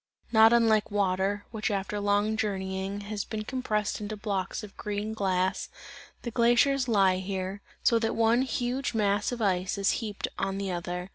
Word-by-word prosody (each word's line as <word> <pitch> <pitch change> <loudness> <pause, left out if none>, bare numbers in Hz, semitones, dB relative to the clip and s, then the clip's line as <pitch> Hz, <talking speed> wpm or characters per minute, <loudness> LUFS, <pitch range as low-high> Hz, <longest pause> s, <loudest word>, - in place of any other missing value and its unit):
Not 220 -1 +7
unlike 225 -3 +4
water, 200 0 0
which 220 0 -2
after 200 0 -2
long 205 +1 +1
journeying, 195 -1 -2
has 205 0 -4
been 215 -1 -5
compressed 215 -4 -2
into 210 +1 -4
blocks 200 -2 -3
of 205 -2 -10
green 210 +1 -3
glass, 190 -3 0 0.5
the 235 - -4
glaciers 245 +3 +3
lie 195 -5 +4
here, 190 +1 -4 0.2
so 230 - +4
that 225 0 -1
one 230 +2 +3
huge 255 0 -2
mass 205 0 +1
of 240 -2 -3
ice 185 0 0
is 200 0 +2
heaped 210 -3 -3
on 195 0 -1
the 195 -1 -2
other. 180 +1 -4
205 Hz, 165 wpm, -28 LUFS, 195-225 Hz, 0.5 s, Not